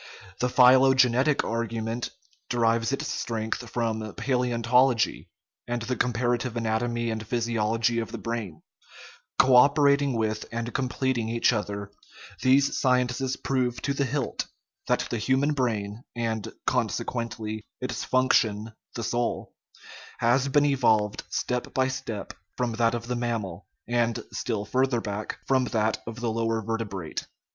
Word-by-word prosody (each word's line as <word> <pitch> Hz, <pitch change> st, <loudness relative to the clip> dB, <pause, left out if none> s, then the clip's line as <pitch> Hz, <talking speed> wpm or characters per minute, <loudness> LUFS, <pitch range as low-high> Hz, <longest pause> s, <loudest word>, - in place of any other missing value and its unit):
The 125 Hz, -, +1 dB
phylogenetic 130 Hz, +2 st, +5 dB
argument 115 Hz, 0 st, -2 dB, 0.4 s
derives 115 Hz, -1 st, +2 dB
its 135 Hz, -, -2 dB
strength 115 Hz, +1 st, -3 dB
from 115 Hz, -2 st, -1 dB, 0.2 s
palaeontology, 125 Hz, 0 st, +2 dB, 0.4 s
and 120 Hz, -1 st, -2 dB
the 125 Hz, +2 st, -1 dB
com 125 Hz, -, +1 dB
parative 120 Hz, +1 st, 0 dB
anatomy 115 Hz, +1 st, -1 dB
and 110 Hz, -1 st, -3 dB
physiology 115 Hz, 0 st, +1 dB
of 115 Hz, -1 st, -4 dB
the 115 Hz, -, -5 dB
brain; 115 Hz, -10 st, -5 dB, 0.7 s
co 130 Hz, -1 st, +6 dB
operating 140 Hz, +1 st, +5 dB
with 110 Hz, -2 st, -1 dB
and 115 Hz, 0 st, -3 dB
completing 130 Hz, -3 st, -1 dB
each 115 Hz, +1 st, +3 dB
other, 100 Hz, -2 st, -3 dB, 0.5 s
these 135 Hz, +2 st, +4 dB
sciences 125 Hz, 0 st, +1 dB
prove 125 Hz, -3 st, -1 dB
to 140 Hz, -, 0 dB
the 140 Hz, 0 st, 0 dB
hilt 135 Hz, 0 st, -2 dB, 0.4 s
that -, -, +1 dB
the 120 Hz, -, -1 dB
human 130 Hz, +6 st, +2 dB
brain 110 Hz, -4 st, -2 dB
(and, 115 Hz, -3 st, -2 dB, 0.2 s
conse -, -, 0 dB
quently, 115 Hz, -2 st, -4 dB, 0.2 s
its 125 Hz, -2 st, -3 dB
function 110 Hz, -4 st, +2 dB, 0.2 s
the 115 Hz, -, -3 dB
soul) 120 Hz, +1 st, -2 dB, 0.6 s
has 125 Hz, +4 st, +2 dB
been 145 Hz, +1 st, +3 dB
evolved 110 Hz, -7 st, +2 dB
step 125 Hz, -1 st, -2 dB
by 130 Hz, 0 st, +3 dB
step 110 Hz, -6 st, -5 dB, 0.2 s
from 125 Hz, -1 st, 0 dB
that 115 Hz, +1 st, +2 dB
of 115 Hz, -1 st, -4 dB
the 125 Hz, +1 st, -2 dB
mammal, 115 Hz, -7 st, -3 dB, 0.2 s
and, 120 Hz, -1 st, 0 dB
still 105 Hz, -3 st, -2 dB
further 130 Hz, +3 st, +1 dB
back, 105 Hz, -1 st, -4 dB
from 130 Hz, -1 st, +2 dB
that 110 Hz, -2 st, 0 dB
of 115 Hz, +1 st, -6 dB
the 120 Hz, -2 st, 0 dB
lower 115 Hz, 0 st, 0 dB
vertebrate. 105 Hz, -6 st, -4 dB
120 Hz, 135 wpm, -27 LUFS, 110-125 Hz, 0.7 s, co